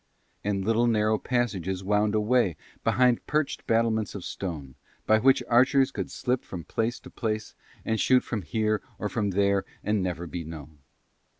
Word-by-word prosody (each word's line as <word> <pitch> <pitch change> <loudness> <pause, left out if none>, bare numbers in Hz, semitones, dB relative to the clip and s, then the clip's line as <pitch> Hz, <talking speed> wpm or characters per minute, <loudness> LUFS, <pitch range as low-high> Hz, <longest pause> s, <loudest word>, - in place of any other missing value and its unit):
And 100 -2 -1
little 115 +2 +3
narrow 110 -1 +2
passages 95 -7 -1
wound 105 +2 +2
away 105 -5 +2 0.3
behind 125 -1 +3
perched 150 -1 -1
battlements 115 -2 +1
of 100 - -6
stone, 75 -8 -5 0.3
by 110 0 +4
which 130 +1 +4
archers 130 +3 +4
could - - -4
slip 125 0 -1
from 90 -3 -7
place 115 +7 -2
to - - -12
place, 110 -2 -3 0.3
and 110 0 0
shoot 130 +3 +4
from 110 -4 -3
here 110 +5 0 0.2
or 105 - -3
from 105 -2 -1
there 100 0 +2 0.2
and 105 -1 +1
never 90 -2 -3
be 85 0 -5
known. 75 -2 -10
110 Hz, 165 wpm, -27 LUFS, 95-120 Hz, 0.3 s, by